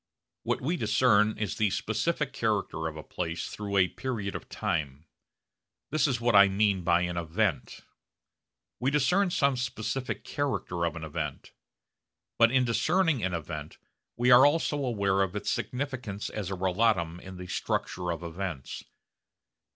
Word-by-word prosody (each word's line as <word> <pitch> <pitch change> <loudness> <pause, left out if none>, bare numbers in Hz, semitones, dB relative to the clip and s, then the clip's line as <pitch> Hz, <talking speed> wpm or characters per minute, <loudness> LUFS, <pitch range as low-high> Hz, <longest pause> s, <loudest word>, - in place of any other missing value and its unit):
What - - -1
we 165 +7 -1
discern 110 -2 +3
is 105 -3 -3
the 105 -1 +2
specific - - -1
character 80 0 -1
of 80 -1 -6
a 75 - -7
place 85 +1 -4
through 100 -1 -3
a 90 -1 +5
period 110 -3 -4
of - - -7
time. 75 -2 -3 0.9
This 155 +1 +3
is 130 -4 0
what 120 -1 +2
I 100 0 +9
mean 100 -1 +1
by 85 0 +3
an 90 -1 -2
'event.' 85 +2 -1 1.0
We 125 - +1
discern 180 +8 +2
some 140 -5 +2
specific 125 +1 -3
character 110 -11 -2
of 85 - -2
an 85 - -6
event. 75 -2 -5 0.9
But 115 0 +6
in 130 -1 +3
discerning 155 - +2
an 90 -1 0
event 75 -1 -6 0.4
we 125 +1 +3
are 125 +2 +9
also 145 -1 +2
aware 100 -6 +1
of 95 0 -1
its 105 - -1
significance 125 -6 -3
as 105 -4 -4
a 95 - -2
relatum 90 -2 +1
in 95 0 -10
the 90 - -7
structure 90 0 -2
of 85 +1 -5
events. 85 -4 -5
100 Hz, 155 wpm, -28 LUFS, 85-125 Hz, 1.0 s, I